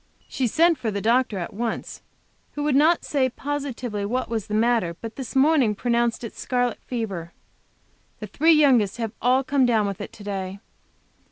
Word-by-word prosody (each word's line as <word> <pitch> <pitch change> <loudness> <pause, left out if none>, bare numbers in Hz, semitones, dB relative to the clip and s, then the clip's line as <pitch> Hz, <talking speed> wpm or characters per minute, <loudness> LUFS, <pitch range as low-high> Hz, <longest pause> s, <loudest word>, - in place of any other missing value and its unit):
She 260 -2 -1
sent 330 +7 +3
for 225 - -2
the 200 -1 -2
doctor 230 0 +1
at 175 - -5
once, 225 +2 -4 0.5
who 295 - -3
would 295 -2 +1
not 315 +4 +4
say 265 -3 +1
positively 255 -6 -4
what 245 +6 -2
was 225 -3 -3
the 210 - -2
matter, 225 -6 +1
but 225 -1 -7
this 265 -1 -7
morning 270 -6 +4
pronounced 235 +1 0
it 230 - -7
scarlet 245 -2 -1
fever. 195 -9 -4 0.9
The 215 - -5
three 310 - +3
youngest 255 -10 +4
have 225 -3 -3
all 255 +2 +3
come 270 +1 +1
down 220 -3 +2
with 200 0 -4
it - - -7
to 210 - -12
day. 195 -1 -4
235 Hz, 180 wpm, -24 LUFS, 210-265 Hz, 0.9 s, not